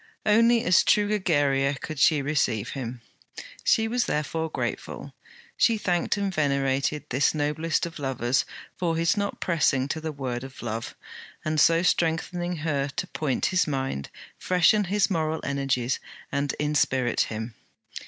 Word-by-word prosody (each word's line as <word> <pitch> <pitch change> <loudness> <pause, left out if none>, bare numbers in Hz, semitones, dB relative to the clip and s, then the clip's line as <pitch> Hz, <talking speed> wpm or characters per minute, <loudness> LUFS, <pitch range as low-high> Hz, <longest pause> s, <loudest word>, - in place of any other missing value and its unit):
Only 230 +2 +4
as 180 -7 +5
true 205 -1 +3
Egeria 145 -8 +2
could 155 -3 -6
she 150 -3 +4
receive 125 -7 0
him. 125 -3 -6 0.6
She 225 -1 +3
was 245 +2 0
therefore 160 +2 -2
grateful, - - -5 0.4
she 230 -2 +3
thanked 180 -1 0
and 200 -1 -1
venerated 140 -1 0
this 135 +5 +2
noblest 155 +3 0
of 165 -2 -8
lovers 135 -1 0 0.3
for 170 -2 -1
his 165 0 +2
not 200 -1 -2
pressing 150 -6 +1
to 160 +1 -3
the 160 0 -3
word 130 -4 -4
of 135 -1 -10
love, 115 -1 -4 0.5
and 155 0 0
so 165 +2 +5
strengthening 175 +1 0
her 140 -3 0
to 140 - -4
point 140 -5 -1
his 185 - +3
mind, 135 - -3 0.3
freshen 185 +3 +3
his 200 +2 +1
moral 160 -2 0
energies 135 -3 -1 0.3
and 140 0 -1
inspirit 135 -4 +1
him. 110 +1 -5
150 Hz, 145 wpm, -26 LUFS, 135-175 Hz, 0.6 s, as